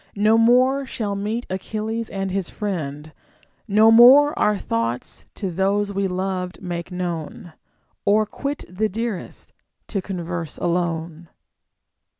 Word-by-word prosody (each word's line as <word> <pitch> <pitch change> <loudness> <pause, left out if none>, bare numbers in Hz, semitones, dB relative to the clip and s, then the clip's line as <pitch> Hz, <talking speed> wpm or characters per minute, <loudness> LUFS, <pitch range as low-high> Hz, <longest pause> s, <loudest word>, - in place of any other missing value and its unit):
iGD - - -4
No 215 +1 +5
more 255 +4 +4
sliall 210 -5 -3
meet 215 +4 -3
Achilles 215 +4 -4
and 195 -1 -3
his 190 -2 -2
iriend; 155 -7 -4 0.6
No 215 +2 +5
more 265 +6 +8
our 210 -1 +3
thoughts 115 -4 -3
to 195 -4 -3
those 200 +3 0
we 195 0 0
loved 185 0 -3
make 175 -1 -5
known, 175 +2 -5 0.5
Or 215 +2 +3
quit 280 +7 -5
the 210 +5 -1
dearest, 225 -2 -5 0.4
to 200 - -2
converse 175 -4 -5
alone. 170 -1 -2
195 Hz, 130 wpm, -22 LUFS, 175-220 Hz, 0.6 s, more